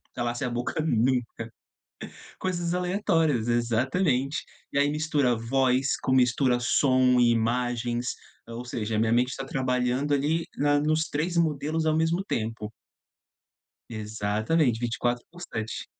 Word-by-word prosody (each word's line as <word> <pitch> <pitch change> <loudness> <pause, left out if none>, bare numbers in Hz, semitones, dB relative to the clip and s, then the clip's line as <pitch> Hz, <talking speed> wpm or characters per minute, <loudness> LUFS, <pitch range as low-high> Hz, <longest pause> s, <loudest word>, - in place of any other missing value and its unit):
calasse 120 +1 -2
a - - -1
boca 120 +6 -2
nunca. 125 -3 +2 1.2
Coisas 175 -2 -2
aleatórias, 175 - +1
exatamente. 130 +5 +1 0.4
E 140 - +2
aí 145 0 +3
mistura 150 -4 +1
voz 130 +3 +1
com, 130 - 0
mistura 125 0 +3
som 130 0 +3
e 120 -1 +5
imagens, 120 +1 -1 0.4
eh, 115 - -8
ou 120 - -6
seja, 110 -2 -3
minha 110 0 +2
mente 125 +2 +1
tá 135 - -5
trabalhando 130 +1 0
ali 150 +4 +1
na 145 0 +3
nos 155 +2 0
3 165 +4 -2
modelos 155 0 0
ao 155 0 +2
mesmo 165 +4 +1
tempo. 110 - -3 1.2
Exatamente, 110 +5 0
24 120 0 -1
por 175 - -13
7. 110 -10 -5
130 Hz, 130 wpm, -26 LUFS, 120-155 Hz, 1.2 s, e